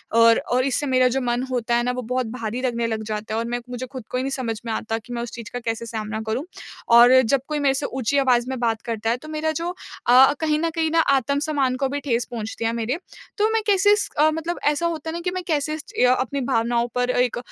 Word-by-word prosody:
और 230 0 +6
और 255 +1 +3
इससे 275 +2 0
मेरा 255 -1 +4
जो 265 +2 -1
मन 240 +1 0
होता 240 -1 0
है 240 - +2
ना 250 - 0
वो 250 - -1
बहुत 250 +2 -2
भारी 235 0 -4
लगने 235 -2 -1
लग 220 -1 -3
जाता 215 0 -4
है 225 - 0
और 230 - -2
मैं 240 +1 -2
मुझे 250 +1 -5
ख़ुद 255 -3 -6
को 250 - -2
ही 255 - -1
नहीं 270 - -2
समझ 230 -5 -3
में 225 - -3
आता 225 +1 -2
कि 235 +2 -9
मैं 235 - -3
उस 240 - -5
चीज़ 230 -2 -8
का 245 - -3
कैसे 230 0 -3
सामना 220 -1 -4
करूँ। 235 +6 -1 0.5
और 240 +1 +8
जब 260 +3 +1
कोई 300 -1 -2
मेरे 275 -2 +3
से 275 +1 -2
ऊँची 265 +1 -1
आवाज़ 255 -2 +2
में 260 -2 -3
बात 225 -2 0
करता 225 -1 -3
है 235 - +1
तो 310 - -13
मेरा 310 0 -1
जो 335 +3 -3 0.4
अ, 260 +3 +7
कहीं 305 -1 +1
न 335 - 0
कहीं 320 -1 0
ना 330 - +3 0.2
आत्मसम्मान 280 0 0
को 270 - 0
भी 285 +1 -2
ठेस 240 -4 -1
पहुँचती 225 0 -4
है 225 - +2
मेरे। 235 +5 -2 0.4
तो 425 +1 +3
मैं 450 - +2
कैसे 410 0 +4
इस 420 - 0
अ, 305 +1 +5
मतलब 325 +2 -3
ऐसा 295 +3 +1
होता 325 -2 -2
है - - -4
ना 340 - -3
कि 360 +1 -2
मैं 370 -1 -4
कैसे 305 -2 0
इस 310 - -5
च 250 - +3 0.2
अपनी 280 +3 -3
भावनाओं 240 -2 +1
पर 250 0 +1
एक 250 -1 +1
250 Hz, 270 wpm, -23 LUFS, 230-290 Hz, 0.5 s, और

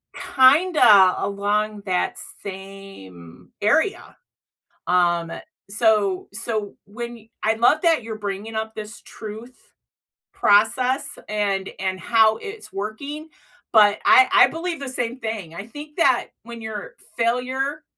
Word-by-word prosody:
kinda 260 - +5
along 205 +1 -1
that 180 -1 -1 0.3
same 190 - -11
area, 320 - 0 0.7
um, 175 -2 +1 0.4
so 210 -4 +1
so 225 0 -2 0.3
w 205 - -20
when 235 -2 -7
I 220 +1 +2
love 245 +8 +3
that 330 -7 +3
you're 220 -1 -7
bringing 205 +2 -5
up 220 0 -4
this 215 0 -8
truth 220 +4 -11 0.6
process 255 +7 +2
and 200 -2 -1
and 190 -1 -2
how 220 -2 +3
it's 420 +1 -9
working, 280 +10 -6 0.4
but 210 -2 +5
I 260 0 +7
I - - +7
believe 330 -2 -4
the 275 - -5
same 245 0 -3
thing, 210 -7 -5
I 200 +4 -7
think 295 +4 -11
that 265 -6 +3 0.2
when 235 -1 -9
you're 220 -2 -7 0.2
failure 260 +5 -1
220 Hz, 125 wpm, -22 LUFS, 200-255 Hz, 0.7 s, I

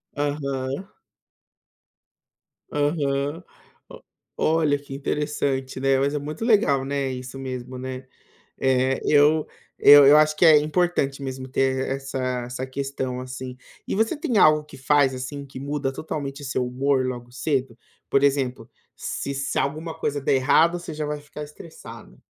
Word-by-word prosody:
Aham. 140 +2 -3 1.8
Aham. 145 +1 -1 0.9
Olha 155 -2 +2
que 140 -1 -11
interessante, 140 -2 -2
né, 135 0 +3
mas 140 +2 +1
é - - 0
muito 150 +6 -6
legal, 200 - +3
né, 140 -1 -1
isso 130 +1 -7
mesmo, 130 -1 -6
né. 130 0 -6 0.5
É 130 0 +2
eu 150 +1 +4 0.3
eu 145 -1 +9
eu 145 +2 +8
acho 155 0 +4
que - - +5
é 155 -2 +8
importante 150 -3 0
mesmo 130 -1 -5
ter 130 0 +1
essa 130 -2 -3
essa 125 +1 -5
questão 130 -1 -4
assim. 130 0 -7 0.3
E - - -2
você 220 +8 +1
tem 250 -6 -1
algo 155 -4 +5
que 150 - -14
faz 135 0 +3
assim 140 +3 -6
que 135 -1 -10
muda 140 0 -2
totalmente 145 -1 -5
seu 130 -1 -1
humor 130 +1 +1
logo 120 -1 -5
cedo? 130 -2 -2 0.3
Por 140 - +3
exemplo, 130 -4 0 0.3
se 140 - -4
se 140 0 -2
alguma 155 +4 -2
coisa 145 -2 -2
der 135 - +2
errado 160 +6 +3
você 170 - -7
já 150 0 -3
vai 150 0 -3
ficar 150 +1 -9
estressada. 145 -6 -12
140 Hz, 150 wpm, -24 LUFS, 130-150 Hz, 1.8 s, eu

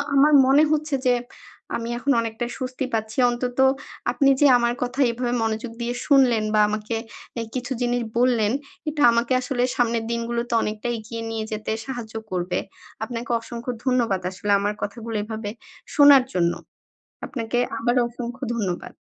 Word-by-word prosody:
আমার 290 +2 +5
মনে 280 +3 +6
হচ্ছে 305 -1 0
যে 250 - +5 0.6
আমি 230 0 -4
এখন 275 +3 0
অনেকটাই 230 +1 -4
স্বস্তি 255 0 -3
পাচ্ছি। 220 0 -2
অন্তত 245 +1 -3 0.5
আপনি 275 -2 +3
যে 290 - +7
আমার 235 0 +1
কথা 250 +3 -5
এভাবে 240 +1 -2
মনোযোগ 225 +1 -2
দিয়ে 240 +1 -1
শুনলেন 255 -6 +4
বা 215 - +4
আমাকে 215 +2 -3 0.4
অ্যাঁ 230 -2 -4
কিছু 255 +1 -4
জিনিস 245 0 +1 0.2
বললেন 235 -4 +3 0.4
এটা 300 -1 -3
আমাকে 235 +2 +1
আসলে 250 -1 -1
সামনের 235 -2 +1
দিনগুলোতে 235 +1 -2
অনেকটা 215 +2 -3
এগিয়ে 230 +1 -7
নিয়ে 225 -1 -3
যেতে 215 0 -3
সাহায্য 245 -4 -6 0.2
করবে। 180 0 -1 0.4
আপনাকে 235 +1 -5
অসংখ্য 235 +2 -5
ধন্যবাদ 235 -7 +1
আসলে 200 +2 -3
আমার 205 +1 0
কথাগুলো 225 +2 -5
এভাবে 220 -1 -5 0.5
শোনার 285 -2 +8
জন্য। 170 -1 +2 0.7
আপনাকে 235 -3 -3 0.2
আবারও 240 +2 +2
অসংখ্য 240 +2 -7
ধন্যবাদ। 190 -6 -3
235 Hz, 150 wpm, -23 LUFS, 220-250 Hz, 0.7 s, শোনার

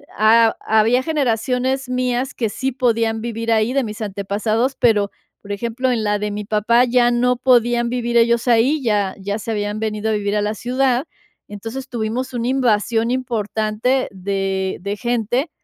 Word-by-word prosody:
ha 225 +1 +4
había 220 +3 +3
generaciones 260 -2 -1
mías 250 +1 -1
que 225 -3 -1
sí 265 +6 -2
podían 230 -3 0
vivir 230 0 -3
ahí, 220 +2 +2
de 275 0 +1
mis 215 -1 -6
antepasados, 215 +5 -1
pero, 210 -4 +3 0.3
por 200 - -9
ejemplo, 235 +5 -2
en 230 -3 0
la 210 0 0
de 210 +1 -2
mi 210 0 -5
papá 220 +4 +3
ya 245 0 +3
no 250 +1 +2
podían 240 -1 +3
vivir 240 -1 -2
ellos 235 +1 +3
ahí, 245 +6 +3
ya 205 -4 0
ya 200 +2 -3
se 225 - -7
habían 205 0 -2
venido 215 0 -2
a - - +1
vivir 205 -1 -1
a 210 - +1
la 210 +1 -1
ciudad. 255 +3 0 0.4
Entonces, 225 +6 -7
tuvimos 240 +3 -3
una 240 -1 -2
invasión 230 -3 +1
importante 230 0 -1
de 190 0 -2
de 200 +2 -3
gente 240 - -1
230 Hz, 170 wpm, -20 LUFS, 210-250 Hz, 0.4 s, ha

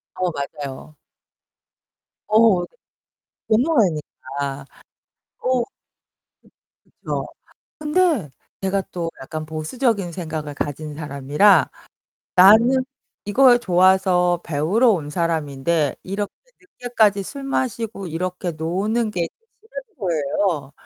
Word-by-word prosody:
어 180 -1 -1
맞아요. 140 0 -7 1.3
어 215 -4 +5
네. - - -5 0.8
공허하니까. 150 - 0 0.8
어. 255 -1 +2 1.2
그쵸. - - -5 0.5
근데 300 - +1 0.3
제가 195 0 0
또 170 -2 -3
약간 155 +4 -6
보수적인 180 - -1
생각을 155 -4 -5
가진 145 +1 -4
사람이라 150 +5 +3 0.6
나는 230 +8 +6 0.4
이걸 245 +4 +5
좋아서 180 -2 +3
배우러 170 - +2
온 155 -7 -1
사람인데 155 -2 0
이렇게 200 +2 -4 0.3
늦게까지 225 - 0
술 275 +7 -8
마시고 230 -7 -2
이렇게 180 +1 -3
노는 200 +8 -1
게 170 -4 -2 0.3
싫은 455 -1 -11
거예요. 160 - -1
180 Hz, 205 characters per minute, -21 LUFS, 155-220 Hz, 1.3 s, 나는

